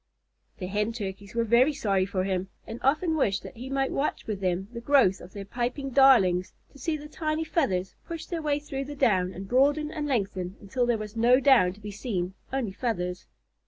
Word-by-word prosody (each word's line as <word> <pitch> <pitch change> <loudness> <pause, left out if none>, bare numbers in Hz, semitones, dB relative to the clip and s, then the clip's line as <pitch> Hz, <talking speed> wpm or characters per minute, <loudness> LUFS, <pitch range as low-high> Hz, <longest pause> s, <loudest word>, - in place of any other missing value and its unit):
The 185 - -5
Hen 210 +4 -1
Turkeys 200 -2 -6
were 230 - +2
very 240 +6 +4
sorry 195 -7 +1
for 185 -1 -1
him, 190 0 -2 0.2
and 225 +2 -7
often 315 +5 +2
wished 205 -10 +1
that - - -10
he 250 +3 -7
might 270 0 0
watch 285 - -1
with 210 -3 -3
them 185 +1 -1
the 235 - -6
growth 240 -8 +4
of 180 - -11
their 200 -1 -7
piping 250 +5 -3
darlings, 215 -10 +5 0.2
to 280 - -15
see 310 +4 -1
the 300 0 -9
tiny 310 0 -2
feathers 195 - 0
push 330 -1 -5
their 335 -2 -4
way 295 -2 +1
through 275 -2 -5
the 290 +1 -7
down 185 -8 +2
and 190 +1 -8
broaden 290 +6 +2
and 300 -2 -3
lengthen 195 -7 -2
until 240 +5 -1
there 240 -2 +2
was 215 0 -7
no 240 +3 +5
down 260 -10 +5
to 200 - -17
be 210 0 -7
seen 190 -4 -3 0.2
only 260 -6 -1
feathers. 185 -5 -3
230 Hz, 210 wpm, -27 LUFS, 190-275 Hz, 0.2 s, darlings